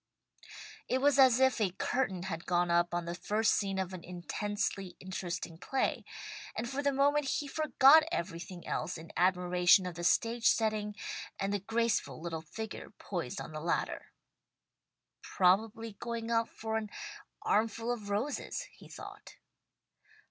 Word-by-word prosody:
It 255 - +1
was 280 0 +4
as 260 -2 +7
if 260 -3 +3
a 190 -4 +1
curtain 195 -3 -1
had 170 -3 -5
gone 175 -1 +2
up 175 0 +3
on 175 0 -2
the 170 - -3
first 210 +5 +1
scene 195 -2 0
of 190 -1 -2
an 180 -2 -7
intensely 190 +1 -3
interesting 180 -3 -5
play, 265 +7 -1 0.5
and 225 +2 -2
for 270 +3 -2
the 285 0 +2
moment 285 +2 +3
he 290 +2 -1
forgot 305 0 +6
everything 175 - -4
else 165 +3 -2
in 160 +1 -10
admiration 180 +1 +4
of 180 - -4
the 175 +1 -6
stage 230 +6 +2
setting, 215 -2 +1 0.4
and 195 +1 -1
the 205 - +1
graceful 225 +1 0
little 165 -1 -4
figure 220 +7 -7
poised - - -4
on - - -7
the - - -6
ladder. - - -1 1.1
"Probably 215 +4 +2
going 235 -1 -4
up 230 0 +2
for 220 0 -3
an 215 -1 -4 0.5
armful 225 +2 +1
of 215 -4 -4
roses," 235 - -2
he - - -15
thought. - - -10
205 Hz, 150 wpm, -32 LUFS, 180-235 Hz, 1.1 s, as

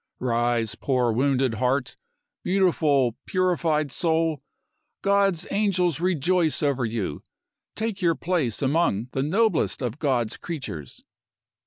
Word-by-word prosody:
"Rise, 120 -2 0
poor 125 -4 0
wounded 130 +1 +1
heart! 125 +4 -1 0.5
Beautiful, 155 - +2
purified 165 -5 +1
soul, 160 -3 0 0.6
God's 195 -3 +2
angels 185 -7 +1
rejoice 175 -2 +1
over 135 -4 +1
you! 110 -10 -3 0.5
Take 220 -2 -3
your 170 -2 +3
place 155 - -1
among 130 -6 +1
the 135 - -1
noblest 160 - +1
of 125 +3 -3
God's 125 -7 0
creatures!" 130 - -7
145 Hz, 110 wpm, -25 LUFS, 125-180 Hz, 0.6 s, your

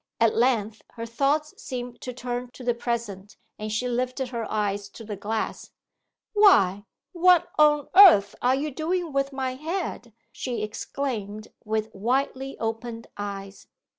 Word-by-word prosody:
At 230 -1 +4
length 225 -3 +1
her 230 -1 -6
thoughts 280 +6 0
seemed 245 -3 -6
to 250 - -5
turn 245 0 -4
to 255 - -11
the 240 0 +2
present, 225 -4 -4 0.2
and 215 0 -4
she 220 +4 -1
lifted 255 +1 -2
her 230 -3 -4
eyes 205 -1 -1
to 225 - -11
the 210 -1 -5
glass. 215 +3 -4 0.6
'Why, 205 - +5 0.3
what 360 -1 +4
on 295 -2 +5
earth 330 - +8
are 250 +1 +3
you 295 +3 -2
doing 330 +2 -2
with 275 0 0
my 265 -1 -2
head?' 305 -4 -4 0.2
she 240 -4 -4
exclaimed, 215 -2 -4
with 220 0 -2
widely 265 +5 -1
opened 225 +1 -4
eyes. 200 -1 -7
240 Hz, 145 wpm, -26 LUFS, 215-275 Hz, 0.6 s, earth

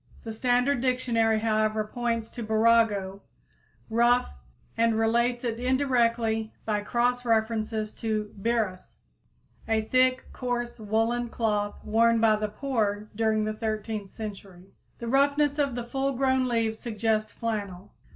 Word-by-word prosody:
The 225 - -5
Standard 245 +3 +1
Dictionary, 230 -4 +1
however, 215 -1 +1
points 230 0 -3
to 240 - -7
burrago, 220 -3 +2 0.7
rough, 240 - +2 0.4
and 230 -1 +2
relates 235 +2 +1
it 230 -1 -2
indirectly 235 -4 +1
by 210 -2 0
cross 245 +3 0
references 220 -2 0
to 215 -2 -2
birrus, 220 -5 -2 0.7
a 220 -1 +1
thick, 255 +3 +2
coarse 240 -1 -3
woolen 225 +3 0
cloth 210 -3 -1
worn 230 +1 +3
by 220 -1 +4
the 210 0 -2
poor 215 -3 -2
during 220 0 +1
the 215 - -2
thirteenth 215 -2 -4
century. 195 -4 -9 0.2
The 235 - -6
roughness 285 +3 +2
of 280 -4 +1
the 245 - -3
full 270 +3 -1
grown 260 0 +1
leaves 225 -2 0
suggests 215 -1 -1
flannel. 205 -5 -5
225 Hz, 130 wpm, -27 LUFS, 215-245 Hz, 0.7 s, by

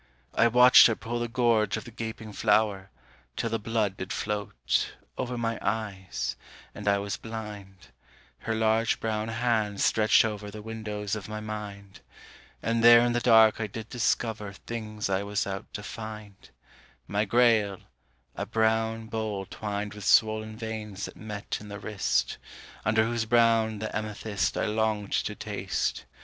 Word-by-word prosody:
I 115 - +4
watched 125 +2 +8
her 115 - 0
pull 120 +2 -4
The 120 - -1
gorge 115 -4 +2
of - - -6
the 120 - -11
gaping 110 -1 -6
flower, 105 -2 +2 0.5
till 115 - -2
the 115 - 0
blood 105 -3 -1
did 95 - -5
float 105 -1 -1 0.2
Over 125 -1 -3
my 115 -1 -2
eyes, 95 - -3 0.4
and 105 - -8
I 100 0 +4
was 100 0 -3
blind 105 - -8 0.5
Her 110 - -2
large 110 +1 +2
brown 110 -1 -2
hand 110 -3 0
stretched 110 0 +4
over 105 -1 -4
The 105 +1 -9
windows 105 -2 -4
of 105 -1 -7
my 110 0 -4
mind; 105 -2 -7 0.6
And 115 0 0
there 120 0 +9
in 120 0 +2
the 120 - +2
dark 110 -2 +5
I 110 - -1
did 110 +2 -8
discover 110 -4 -1
Things 110 0 -5
I 95 0 0
was 100 +1 -1
out 100 +1 -6
to 105 - -5
find: 105 -2 -8 0.6
My 105 +1 +1
Grail, 110 -3 +3 0.6
a - - -4
brown 110 0 +1
bowl 110 -3 -3
twined 105 +1 -4
With 105 -1 -9
swollen 110 0 +3
veins 110 -3 -5
that - - -9
met 105 -1 -5
in 105 - -10
the 100 - -6
wrist, 100 - -1 0.4
Under 110 +1 +3
whose 115 -1 -1
brown 115 -1 +3
the 110 +1 -5
amethyst 105 -1 -2
I - - +1
longed 110 -1 -1
to - - 0
taste. - - -3
110 Hz, 160 wpm, -28 LUFS, 105-115 Hz, 0.6 s, there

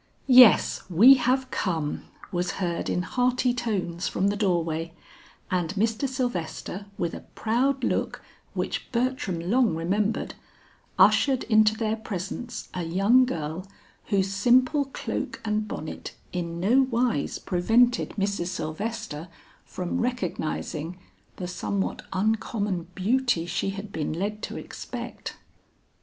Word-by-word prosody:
"Yes, 250 -6 +7
we 215 +10 +8
have 260 0 +1
come," 160 -6 -2 0.3
was 175 +1 -1
heard 175 -3 -2
in 180 - 0
hearty 250 +2 +1
tones 200 -8 -2
from 195 +2 +1
the 205 - 0
door 185 -5 +2
way, 165 +1 -4 0.6
and 180 0 0
Mr. 225 +5 0
Sylvester 205 - -3
with 170 -1 -1
a - - -5 0.2
proud 255 +4 +1
look - - -1 0.3
which - - -3
Bertram 245 -8 -1
long 220 +3 +2
remembered, 200 +6 -1 0.6
ushered 265 -3 +5
into 215 -1 +4
their 220 -1 0
presence 220 +2 -5
a 180 - -3
young 195 +10 +4
girl 165 -3 -4 0.4
whose 195 -2 +1
simple 255 +7 +4
cloak 270 - -4
and 215 0 0
bonnet 155 -6 -6 0.2
in 170 -1 -3
no 230 +9 +4
wise 240 - 0
prevented 230 +7 +2
Mrs. 200 -3 -1
Sylvester 180 0 -4 0.4
from 185 +8 -3
recognizing 180 -7 -3 0.4
the 180 - -5
somewhat 190 +2 -2
uncommon 205 -2 -1
beauty 225 -2 +1
she 175 +3 -1
had 195 +1 -6
been 155 -4 -2
led 205 +5 -3
to - - -5
expect. - - -7
200 Hz, 125 wpm, -26 LUFS, 175-240 Hz, 0.6 s, we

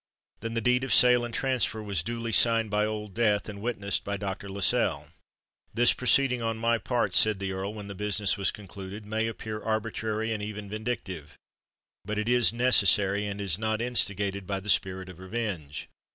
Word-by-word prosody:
Then 115 +1 -5
the 115 - 0
deed 125 +3 +2
of 135 - -3
sale 125 -1 +5
and 120 - -4
transfer 120 -3 0
was 100 -5 -1
duly 115 +4 -4
signed 115 -1 +4
by 105 +1 +2
Old 105 -2 -5
Death, 105 -2 +1
and 100 -1 -8
witnessed 105 -3 -1
by 100 0 -3
Dr. 100 0 -5
Lascelles. 95 -7 0 0.6
"This 120 +1 +6
proceeding 125 -1 +3
on 115 -1 -1
my 115 +1 +1
part," 120 -7 -1
said 110 +1 +4
the 95 0 -4
Earl, 95 +3 -4
when 105 -1 -7
the 100 - -6
business 105 0 0
was 100 - 0
concluded, 100 +1 -9
"may 110 +2 -1
appear 110 -1 -6
arbitrary 110 0 -2
and 105 - -4
even 105 -1 -6
vindictive; 105 -9 -5 0.7
but 105 +2 -4
it 105 +1 -2
is 120 -2 +4
necessary, 105 -4 +3
and 100 0 -5
is 100 -3 -1
not 110 0 -1
instigated 100 -5 -1
by 100 -1 -2
the 100 +2 -8
spirit 95 0 +1
of 90 -1 -11
revenge. 95 -7 -5
105 Hz, 185 wpm, -27 LUFS, 100-115 Hz, 0.7 s, This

